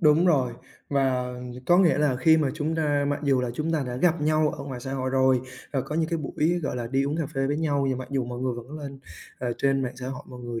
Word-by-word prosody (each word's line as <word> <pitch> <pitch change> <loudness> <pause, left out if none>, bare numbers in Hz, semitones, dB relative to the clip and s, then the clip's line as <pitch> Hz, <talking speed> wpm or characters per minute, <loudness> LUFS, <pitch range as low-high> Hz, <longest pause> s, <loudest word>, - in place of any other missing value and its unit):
Đúng 155 +2 +5
rồi. 135 -8 +3 0.4
Và 130 -3 +1 0.3
có 175 +1 +6
nghĩa 170 -7 +4
là 145 -4 +2
khi 160 +5 +5
mà 155 -3 +2
chúng 155 +1 -1
ta 145 -3 +1
mặc 145 - -1
dù 135 -3 +3
là 125 -1 -1
chúng 155 +4 -1
ta 155 -3 +1
đã 125 0 -4
gặp 170 +3 +2
nhau 155 0 +3
ở 140 - -5
ngoài 130 -3 -6
xã 135 +2 -5
hội 130 -1 -1
rồi 130 -1 +4 0.3
và 135 - +1
có 150 - -5
những 160 0 +1
cái 170 - 0
buổi, 155 +3 0
gọi 140 - -2
là, 120 -1 -3
đi 135 +3 +1
uống 145 - -1
cà 160 -3 -1
phê 135 0 +1
với 145 +1 0
nhau 145 -3 +1
và 130 - -1
mặc 130 - -6
dù 135 -3 0
mọi 120 0 -6
người 130 -1 0
vẫn 125 +6 -8
lên, 140 -2 -7 0.4
ờ, 125 -1 -1
trên 135 0 +2
mạng 125 -1 -4
xã 125 0 -5
hội, 130 -1 -6
mọi 125 - -9
người 120 -1 -4
140 Hz, 285 wpm, -26 LUFS, 130-155 Hz, 0.4 s, có